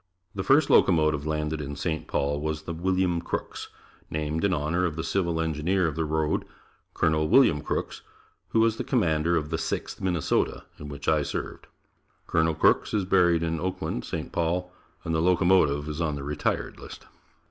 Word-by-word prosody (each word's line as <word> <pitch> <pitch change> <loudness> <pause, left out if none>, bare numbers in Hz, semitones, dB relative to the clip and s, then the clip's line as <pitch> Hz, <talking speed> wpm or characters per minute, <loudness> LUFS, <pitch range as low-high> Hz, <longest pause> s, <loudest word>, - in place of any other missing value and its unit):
The 95 - -3
first 135 +7 +4
locomotive 75 -4 +3
landed 75 0 -2
in 70 0 -5
St. 80 -1 -3
Paul 70 +1 -1
was 80 0 -3
the 85 - -5
"William 90 0 0
Crooks," - - -5 0.4
named 75 +1 -2
in 100 - +2
honor 85 +2 0
of 85 -4 -1
the 80 - -3
Civil 85 -1 -1
Engineer 80 +4 0
of 80 -3 -1
the 80 0 -1
road, 80 0 0 0.5
Col. 80 -1 +2
William 110 - +5
Crooks, - - -3 0.5
who 110 - +2
was 115 0 +2
the - - -2
Commander 85 - +1
of 75 0 -3
the 80 - -1
"Sixth 80 - -4
Minnesota," 90 -5 0 0.2
in 75 - -8
which 70 -1 -8
I 75 -1 +3
served. - - -5 0.6
Colonel 80 -1 +1
Crooks 110 - +2
is 100 -3 +1
buried 90 -3 +3
in 80 -1 -1
Oakland, 90 -7 -3
St. - - -5
Paul 90 +2 -1 0.3
and 80 - -2
the 80 - +1
locomotive 85 -5 +3
is 75 +2 -4
on 75 -3 0
the 70 - -6
retired 75 +1 -2
list. - - -11
80 Hz, 180 wpm, -26 LUFS, 75-90 Hz, 0.6 s, William